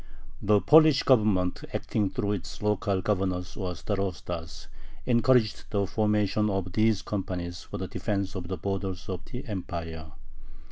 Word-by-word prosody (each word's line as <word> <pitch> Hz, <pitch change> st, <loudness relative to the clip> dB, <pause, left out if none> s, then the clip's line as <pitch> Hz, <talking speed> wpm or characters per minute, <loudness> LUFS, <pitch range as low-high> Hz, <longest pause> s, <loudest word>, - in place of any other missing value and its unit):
The 105 Hz, 0 st, +4 dB
Polish 155 Hz, -2 st, +6 dB
Government, 105 Hz, -8 st, +3 dB
acting 105 Hz, -3 st, 0 dB
through 100 Hz, +2 st, -1 dB
its 100 Hz, 0 st, -5 dB
local 100 Hz, -2 st, +1 dB
governors 95 Hz, -3 st, -1 dB
or 90 Hz, -3 st, -3 dB
starostas, 90 Hz, -5 st, -4 dB, 0.4 s
encouraged 120 Hz, -2 st, +3 dB
the 100 Hz, -2 st, +1 dB
formation 105 Hz, 0 st, +1 dB
of 95 Hz, -2 st, -2 dB
these 110 Hz, -2 st, +2 dB
companies 90 Hz, -3 st, -4 dB
for -, -, -7 dB
the -, -, -4 dB
defense 100 Hz, -2 st, -2 dB
of 90 Hz, -3 st, -5 dB
the 95 Hz, +1 st, -3 dB
borders 95 Hz, -2 st, -3 dB
of 90 Hz, -3 st, -4 dB
the 125 Hz, +4 st, -7 dB
Empire. 85 Hz, -, -5 dB
100 Hz, 140 wpm, -28 LUFS, 90-105 Hz, 0.4 s, Polish